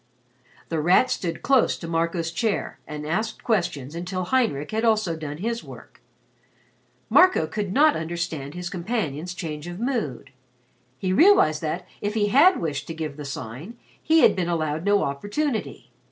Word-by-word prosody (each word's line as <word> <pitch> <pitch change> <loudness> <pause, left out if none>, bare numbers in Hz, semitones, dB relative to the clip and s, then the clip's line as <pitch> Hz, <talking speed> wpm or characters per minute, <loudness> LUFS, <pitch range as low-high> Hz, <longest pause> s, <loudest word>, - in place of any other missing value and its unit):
The 165 - -1
Rat 180 +11 +4
stood 165 -3 -3
close 265 -3 +3
to 165 - -8
Marco's 165 0 -1
chair 215 +4 -2
and 150 0 -6
asked 215 +8 -2
questions 175 - -1
until 180 +2 -3
Heinrich 180 - 0
also 215 -5 +2
had 165 - -5
done 150 -1 -5
his 230 +6 -3
work. - - -13 1.1
Marco 365 - +5
could 200 +4 -4
not 300 +7 +4
understand 160 -3 -4
his 180 0 -5
companion's 180 - -3
change 155 -3 -5
of 175 +1 -7
mood. 230 - -3 0.7
He 185 +4 -1
realized 200 - +5
that, 170 +3 -3
if 205 +1 -2
he 205 -2 +2
had 305 - +5
wished 145 -3 -3
to 165 - -6
give 155 -3 -4
the 150 0 -8
Sign, 140 - -7 0.2
he 320 +1 +4
had - - +6
been 180 -2 -1
allowed 155 -1 -1
no 205 0 +3
opportunity. 205 - -3
175 Hz, 160 wpm, -24 LUFS, 155-220 Hz, 1.1 s, had